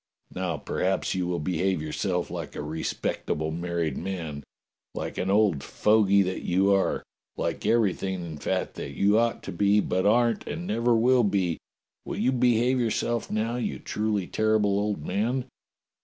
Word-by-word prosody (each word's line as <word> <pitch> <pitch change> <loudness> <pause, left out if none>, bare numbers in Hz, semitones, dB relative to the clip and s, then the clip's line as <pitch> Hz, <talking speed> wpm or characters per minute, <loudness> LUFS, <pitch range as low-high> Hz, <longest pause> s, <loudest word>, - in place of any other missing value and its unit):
"Now 90 -4 -2
perhaps 95 +5 -1
you 90 -2 -1
will 90 -1 -1
behave 90 +3 0
yourself 90 +4 -2
like - - -6
a - - -4
re 80 +2 -4
spectable 80 +1 -2
married 85 -4 -2
man, 80 -6 -5 0.5
like - - -4
an 95 - -1
old 100 -8 +3
fogey 100 +1 +3
that 95 0 -3
you 95 +3 +3
are, 95 -1 +1 0.3
like - - -2
everything 95 -4 +1
in 80 -2 -7
fact - - -1
that - - -5
you 105 +2 +4
ought 115 0 0
to - - -5
be, 100 +1 +3
but 95 -1 +1
aren't 115 0 +3
WATCHBELL - - -28
STREET - - -4
^55 - - -6
and 175 +2 -6
never 115 +2 +2
will 125 +2 +4
be! 95 -5 0 0.4
Will - - -5
you 130 - +2
behave 125 0 +3
yourseK 120 0 -1
now, 110 +3 -1
you 125 - -2
truly 105 -3 -1
terrible 105 -1 +2
old 105 -7 -2
man? 115 +8 0
100 Hz, 175 wpm, -26 LUFS, 90-110 Hz, 0.5 s, you